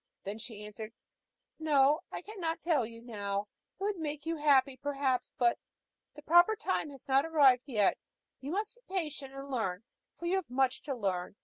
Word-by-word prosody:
Then 205 +3 -5
she 220 -3 -7
answered: 215 +1 -8 0.7
"No, 295 -1 +4
I - - -5
cannot 350 -6 -3
tell 300 -9 +1
you 230 0 -12
now. 200 -4 -2 0.4
It - - -5
would 410 -1 0
make 300 -1 -4
you 330 0 -1
happy, 275 -3 +4
perhaps, 270 -2 -1
but 240 -1 +3 0.6
the 300 - -11
proper 345 +7 +6
time 375 -7 -1
has 275 -3 -13
not 270 +1 +4
yet 325 - -6
arrived. 255 -8 +4 0.4
You 270 - -6
must 415 +6 -2
be 485 -6 -12
patient, 300 -6 -3
and 275 0 -7
learn, 205 -6 -1 0.3
for 345 - -7
you 365 +3 +2
have 375 -8 -4
much 260 0 +1
to 275 - 0
learn. 190 -5 -2
275 Hz, 185 wpm, -32 LUFS, 235-325 Hz, 0.7 s, proper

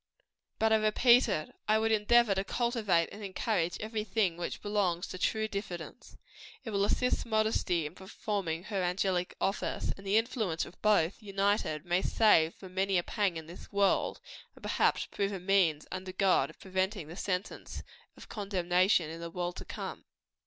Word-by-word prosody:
But 220 0 +3
I - - +6
repeat 235 +3 +5
it 155 -6 -2
I 215 0 +4
would 225 0 +1
endeavor 220 0 +4
to 195 0 -1
cultivate 210 -7 +1
and 205 +1 -9
encourage 190 -3 -1
every 215 0 -3
thing 200 -4 0
which 175 0 -5
belongs 195 -4 0
to 185 - -7
true 220 +3 +1
diffidence. 195 -2 -7 0.5
It 225 - -5
will 200 -1 +2
assist 250 +4 +1
modesty 215 -7 +1
in 150 - -6
performing 190 -3 -4
her 200 -2 -2
angelic 180 0 0
office; 195 - -1
and 195 0 -12
the 200 +2 +4
influence 220 -8 0
of 180 - -15
both, 205 -2 +2
united, 200 -5 0
may 175 +1 +1
save 170 -8 +4
from 185 -2 -12
many 190 0 +1
a 175 - +1
pang 195 -4 0
in 160 - -7
this 170 +3 -12
world, 200 -1 +2 0.4
and - - -18
perhaps - - +1
prove 200 0 -2
a 195 - -4
means, 180 -5 +2
under 185 0 -5
God, 195 -2 +3
of - - -15
preventing 190 -2 -2
the 165 - -9
sentence 185 +1 -4 0.3
of - - -12
condemnation 185 -3 +1
in 165 +1 -7
the 170 - -5
world 175 +1 -3
to - - -7
come. - - -7
195 Hz, 175 wpm, -31 LUFS, 175-215 Hz, 0.5 s, I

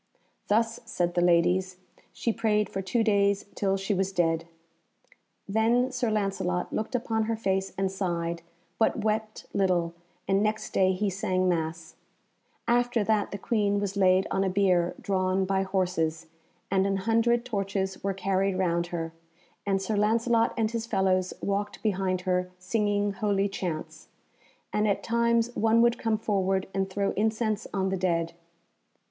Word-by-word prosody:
"Thus," 225 +2 +1
said 175 -6 -1
the 175 - +1
ladies, 180 +2 +2 0.3
"she 230 - -1
prayed 215 -2 +1
for 195 - -2
two 225 +5 0
days 200 -2 +2
till 195 -1 0
she 195 +2 -1
was 190 0 0
dead." 165 -3 +1 1.0
Then 230 +5 +2
Sir 250 -2 -1
Lancelot 195 -4 -1
looked 220 +4 -2
upon 225 -2 0
her 225 +1 -1
face 195 -3 -1
and 195 0 0
sighed, 170 -3 -2 0.4
but 220 -1 +2
wept 215 0 -2
little, 180 -4 +1 0.3
and 195 +1 +3
next 215 +1 -1
day 190 0 +4
he 200 +2 -1
sang 185 0 0
Mass. 165 -2 -2 0.7
After 240 -1 +2
that 215 0 +1
the 200 - -5
Queen 205 -1 +1
was 200 -1 -3
laid 185 -1 +4
on 195 - +1
a 190 - +1
bier 185 -3 +2
drawn 190 -1 0
by 190 0 +1
horses, 180 -4 -1 0.5
and 190 0 +3
an 195 0 0
hundred 235 +1 +2
torches 195 -4 -2
were 195 -1 -1
carried 195 0 0
round 170 -2 +1
her, 165 -2 -4 0.5
and 195 -1 +2
Sir 195 +3 -2
Lancelot 230 +2 +2
and 220 -1 +1
his 230 -1 -3
fellows 190 -3 +1
walked 205 +1 -2
behind 190 -3 0
her 180 0 0
singing 205 +1 0
holy 200 0 0
chants, 180 -5 -5 0.7
and 210 0 +2
at 200 - 0
times 235 0 +1
one 225 +1 +3
would 235 0 +2
come 225 -2 +1
forward 195 -3 0
and 195 0 -1
throw 200 +1 0
incense 220 0 0
on 190 -1 0
the 190 - -1
dead. 170 -2 0
195 Hz, 155 wpm, -27 LUFS, 185-215 Hz, 1.0 s, day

